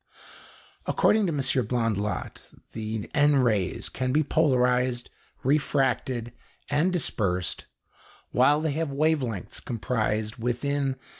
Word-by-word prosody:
According 215 -2 +3
to - - 0
M. 145 -3 -1 0.3
Blondlot 110 -5 -2 0.2
the 110 -1 -4
N 145 -1 +4
rays 110 -8 +1
can 130 0 -2
be 155 +3 +3
polarised, 125 -5 +1 0.3
refracted, 130 -4 0 0.4
and 155 +6 +2
dispersed, 95 - -1 0.7
while 145 +5 +4
they 160 -1 0
have 160 +1 -2
wavelengths 140 - -1
comprised 110 -3 -1
within 135 +3 -1
125 Hz, 100 wpm, -26 LUFS, 115-145 Hz, 0.7 s, N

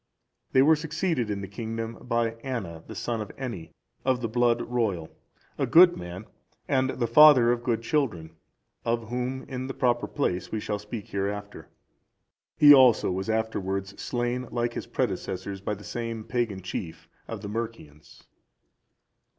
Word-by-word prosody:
They 130 - +6
were 160 +3 +6
succeeded 160 - -1
in 100 -1 -2
the 100 - -5
kingdom 115 +2 -5
by 115 -2 0
Anna,(378) 95 -12 -5
the - - -8
son 115 -2 -2
of 105 - -5
Eni, 115 -11 -5 0.3
of 130 -1 +1
the 120 - -2
blood 120 +1 +2
royal, 105 -10 -2 0.5
a - - +1
good 175 +1 +7
man, 90 +4 -7 0.4
and 130 0 +2
the 120 -2 -1
father 125 0 +7
of 120 -1 -1
good 115 -1 0
children, 110 - -1 0.5
of 115 -1 -1
whom, 125 +2 -3
in 130 -1 -5
the 135 - -6
proper 120 -2 +1
place, 90 -11 -2
we 110 - -1
shall 105 0 -3
speak 105 +1 -7
hereafter. 100 +1 -4 0.9
He 145 -1 +9
also 130 -8 +6
was 95 +3 -3
afterwards 100 -3 -2
slain 120 0 -2
like 120 0 -1
his - - -5
predecessors 95 +1 -3
by 105 +1 -2
the 105 - -13
same 115 -1 -4
pagan 110 -5 -2
chief 85 -2 -6 0.2
of - - -6
the - - -6
Mercians. 105 -10 -7
115 Hz, 160 wpm, -27 LUFS, 100-125 Hz, 0.9 s, He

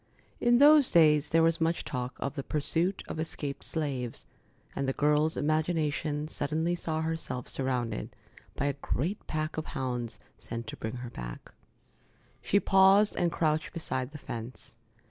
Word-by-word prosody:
In 240 0 +4
those 290 0 +7
days 150 -3 +5
there 165 0 +4
was 165 0 +2
much 165 +1 +1
talk 125 -1 -4
of 140 - -2
the 140 - -3
pursuit 165 +7 -1
of - - -5
escaped 145 -3 -4
slaves, 135 -7 -3 0.5
and 140 - -1
the - - 0
girl's 150 +2 +2
imagination 155 -1 0
suddenly 160 +2 -1
saw 160 -2 -2
herself 160 -6 -3
surrounded 125 - -2 0.4
by 140 - -1
a 140 - +1
great 175 - -2
pack 155 0 -2
of 155 - -3
hounds 125 -3 -3 0.2
sent 115 0 -6
to 110 - -6
bring 110 +2 -4
her 120 -1 -7
back. - - -8 0.9
She 200 - +3
paused 195 +2 +5
and 175 -1 +1
crouched 155 -2 0
beside 130 -6 -3
the 150 - -8
fence. 115 -4 -8
150 Hz, 155 wpm, -29 LUFS, 130-165 Hz, 0.9 s, those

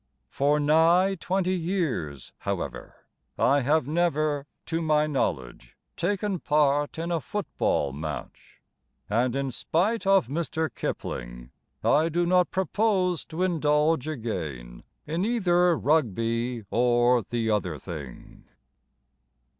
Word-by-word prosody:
For 145 +2 +2
nigh 165 +6 +4
twenty 185 +1 0
years, 160 - -3
however, - - -5 0.3
I 140 +1 +3
have 145 +1 +2
never, 155 -3 0 0.2
to 165 0 -2
my 155 -1 +2
knowledge, 65 - -3 0.2
Taken 195 +1 -1
part 145 -1 +1
in 165 +2 -3
a 165 -2 0
football 140 - -1
match; 75 -3 -8 0.5
And, 120 +3 +1
in 135 -1 -1
spite 195 - 0
of 195 -7 +5
Mr. 160 +2 -2
Kipling, - - -5 0.3
I 155 +3 +3
do 175 +2 +1
not 180 0 +3
propose 190 -2 0
to 165 +3 -3
indulge 155 -3 +2
again 80 - -5 0.2
In 165 +4 -2
either 180 -7 +2
Rugby 115 - 0
or 120 0 +3
the 115 +1 -2
other 90 -7 -1
thing. 75 -7 -9
150 Hz, 115 wpm, -26 LUFS, 115-175 Hz, 0.5 s, of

